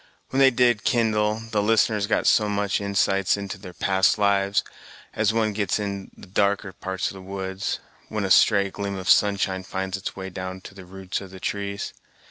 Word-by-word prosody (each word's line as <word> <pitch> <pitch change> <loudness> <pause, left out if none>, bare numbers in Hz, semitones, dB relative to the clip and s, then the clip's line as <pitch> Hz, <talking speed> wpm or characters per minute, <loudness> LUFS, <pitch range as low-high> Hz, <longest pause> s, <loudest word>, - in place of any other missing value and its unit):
When 135 - 0
they 135 -1 +7
did 120 -3 +2
kindle, 110 -2 +1
the 105 -2 +1
listeners 105 -1 +2
got - - +1
some 105 -2 +3
such 100 -1 0
insights 100 -1 +1
into 100 -1 -6
their 95 -2 -9
past 95 +2 +2
lives, 100 -1 +2 0.5
as 105 0 +2
one 110 -1 +1
gets 100 -2 0
into 100 -2 -4
the - - -11
darker 100 +1 0
parts 95 +1 -3
of - - -8
the 95 - -10
woods, 95 0 -4 0.3
when 105 -1 -2
a 95 - -2
stray 100 0 +5
gleam 100 0 -4
of 95 -1 -6
sunshine 100 -2 +3
finds 95 0 -4
its 95 - -6
way 95 0 -6
down 95 +1 -6
to 95 - -11
the 95 -1 -12
roots 95 +1 -5
of 95 - -9
the 95 0 -11
trees. 100 +1 -3
100 Hz, 195 wpm, -24 LUFS, 95-105 Hz, 0.5 s, they